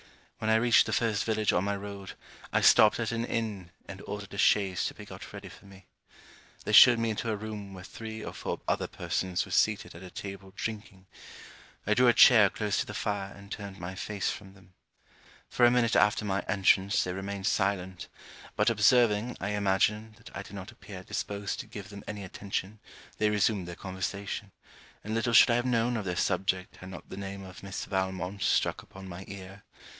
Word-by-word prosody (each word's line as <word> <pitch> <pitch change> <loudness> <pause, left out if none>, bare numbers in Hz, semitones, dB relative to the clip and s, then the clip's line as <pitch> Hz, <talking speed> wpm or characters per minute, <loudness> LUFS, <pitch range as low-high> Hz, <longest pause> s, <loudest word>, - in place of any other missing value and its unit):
When 110 - -1
I 110 - +5
reached 120 +1 +5
the - - -2
first 110 -3 +1
village 110 -1 +1
on 90 - +2
my 100 0 -1
road, 100 -1 -7 0.4
I - - +2
stopped 105 +1 +6
at 115 -1 -1
an 115 0 -1
inn, 110 -7 -3 0.2
and 95 0 -9
ordered 105 -1 -6
a 100 - -6
chaise 95 -4 +3
to - - -3
be - - -10
got - - -10
ready - - -9
for - - -15
me. 95 -1 -15 0.8
They - - -2
showed 120 -1 +9
me 115 -1 0
into 110 +2 -3
a 110 - 0
room 105 -2 -7
where 90 - -10
three 110 +2 -8
or - - -6
four - - -4
other - - 0
persons 95 -1 -2
were - - -12
seated 110 -1 +1
at 85 - -11
a 95 - -9
table 95 0 -8
drinking. 105 -4 -6 0.8
I 105 - +3
drew 125 +3 +4
a 120 - +6
chair 110 -4 +7
close 105 0 -1
to - - -1
the - - -7
fire 100 -2 -2
and 100 0 -14
turned 100 -2 -6
my 90 +2 -5
face 100 +1 -2
from 95 -1 -10
them. 95 -2 -20 0.7
For 120 - +4
a - - +4
minute 120 -2 +2
after 105 +2 +3
my 100 -1 0
entrance 100 0 +3
they 90 - -3
remained 95 +1 -5
silent; 95 -3 -1 0.5
but - - +3
observing, 115 +1 +3
I 100 - -3
imagine, 105 +2 +1
that 115 - -14
I - - -4
did 100 - -12
not 95 -1 -8
appear 95 -3 -11
disposed 100 0 -4
to 130 - -6
give 105 -3 -9
them 100 0 -10
any 105 -1 -5
attention 100 +2 -5 0.4
they 110 - +3
resumed 105 -3 +1
their 85 - -7
conversation, 100 +2 -5 0.5
and 110 - -4
little 115 +1 0
should 120 - +8
I - - +3
have 120 - -1
known 120 0 +1
of 110 -3 -3
their 90 -1 -2
subject 95 +1 -1
had 95 - -10
not 95 - -10
the - - -8
name 100 0 -6
of 95 -1 -11
Miss 100 -1 -5
Valmont 95 0 -3
struck - - +1
upon 95 0 -12
my 90 +1 -8
ear. 100 0 -10
100 Hz, 210 wpm, -29 LUFS, 95-110 Hz, 0.8 s, showed